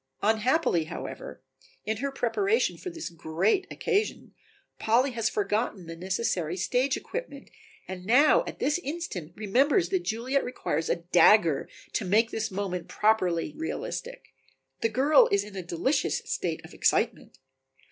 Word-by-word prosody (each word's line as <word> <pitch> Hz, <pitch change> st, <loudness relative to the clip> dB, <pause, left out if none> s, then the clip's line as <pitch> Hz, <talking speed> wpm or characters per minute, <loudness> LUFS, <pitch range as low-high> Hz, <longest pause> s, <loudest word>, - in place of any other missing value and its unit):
Unhappily, 220 Hz, -, +2 dB
however, -, -, -8 dB, 0.4 s
in 220 Hz, 0 st, -1 dB
her 280 Hz, +5 st, -2 dB
preparation 395 Hz, -, +1 dB
for 365 Hz, -, -7 dB
this 330 Hz, -, -7 dB
great 170 Hz, -, 0 dB
occasion, 435 Hz, -2 st, -2 dB, 0.5 s
Polly 245 Hz, +5 st, +2 dB
has 230 Hz, -2 st, 0 dB
forgotten 210 Hz, -2 st, -1 dB
the 165 Hz, 0 st, -7 dB
necessary 180 Hz, -2 st, -2 dB
stage 250 Hz, +8 st, +1 dB
equipment 385 Hz, -, -7 dB, 0.4 s
and 185 Hz, -1 st, -7 dB
now 275 Hz, -, +5 dB
at -, -, -6 dB
this 300 Hz, +4 st, 0 dB
instant 285 Hz, -, -5 dB
remembers 270 Hz, -, +2 dB
that 380 Hz, -, +1 dB
Juliet 255 Hz, 0 st, -1 dB
requires 165 Hz, -10 st, -3 dB
a -, -, +3 dB
dagger 170 Hz, -1 st, +4 dB, 0.2 s
to -, -, 0 dB
make 215 Hz, +5 st, +2 dB
this 220 Hz, -1 st, -2 dB
moment 185 Hz, -2 st, -4 dB
properly 185 Hz, -6 st, +1 dB
realistic. 485 Hz, +9 st, -5 dB, 0.5 s
The 225 Hz, -, +2 dB
girl 275 Hz, +6 st, +5 dB
is 200 Hz, 0 st, +3 dB
in 205 Hz, -1 st, -11 dB
a 190 Hz, -, -3 dB
delicious 175 Hz, -, -1 dB
state -, -, -3 dB
of -, -, -13 dB
excitement. -, -, 0 dB
220 Hz, 140 wpm, -27 LUFS, 185-285 Hz, 0.5 s, now